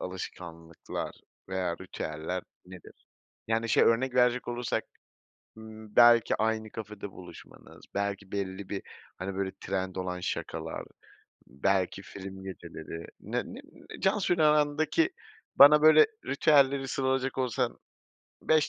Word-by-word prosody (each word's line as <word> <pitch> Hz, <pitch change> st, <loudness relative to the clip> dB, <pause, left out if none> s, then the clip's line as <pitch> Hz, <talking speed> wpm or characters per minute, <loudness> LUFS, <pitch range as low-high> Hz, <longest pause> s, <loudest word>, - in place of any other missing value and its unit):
alışkanlıklar 85 Hz, -3 st, -7 dB, 0.4 s
veya 90 Hz, -2 st, -2 dB
ritüeller 90 Hz, -1 st, -5 dB, 0.2 s
nedir? 90 Hz, -2 st, -14 dB, 0.4 s
Yani, 115 Hz, +1 st, 0 dB
şey, -, -, +5 dB
örnek 125 Hz, +2 st, +2 dB
verecek 125 Hz, 0 st, +3 dB
olursak, 120 Hz, -1 st, -2 dB, 0.7 s
ımm, 110 Hz, -1 st, -12 dB
belki 120 Hz, -1 st, +6 dB
aynı 110 Hz, 0 st, -1 dB
kafede 105 Hz, -2 st, -7 dB
buluşmanız, 90 Hz, -1 st, -14 dB
belki 100 Hz, -1 st, -3 dB
belli 95 Hz, -1 st, -4 dB
bir 100 Hz, -, -4 dB, 0.4 s
hani 95 Hz, +1 st, -4 dB
böyle 95 Hz, -1 st, -1 dB
trend 95 Hz, -1 st, -3 dB
olan 90 Hz, -1 st, -3 dB
şakalar, 90 Hz, -, -4 dB, 0.6 s
belki 95 Hz, +6 st, 0 dB
film 95 Hz, -1 st, -9 dB
geceleri, 85 Hz, -3 st, -8 dB
ne -, -, -2 dB
ne -, -, -9 dB
ne -, -, -13 dB
Cansu'yla 180 Hz, -6 st, +3 dB
arandaki 150 Hz, -, +2 dB, 0.5 s
bana, 150 Hz, +2 st, +9 dB
böyle, 155 Hz, 0 st, +8 dB, 0.2 s
ritüelleri 140 Hz, -1 st, +3 dB
sıralayacak 135 Hz, 0 st, -1 dB
olsan 125 Hz, -4 st, -1 dB, 0.6 s
5 155 Hz, -1 st, +3 dB
105 Hz, 115 wpm, -29 LUFS, 95-130 Hz, 0.7 s, bana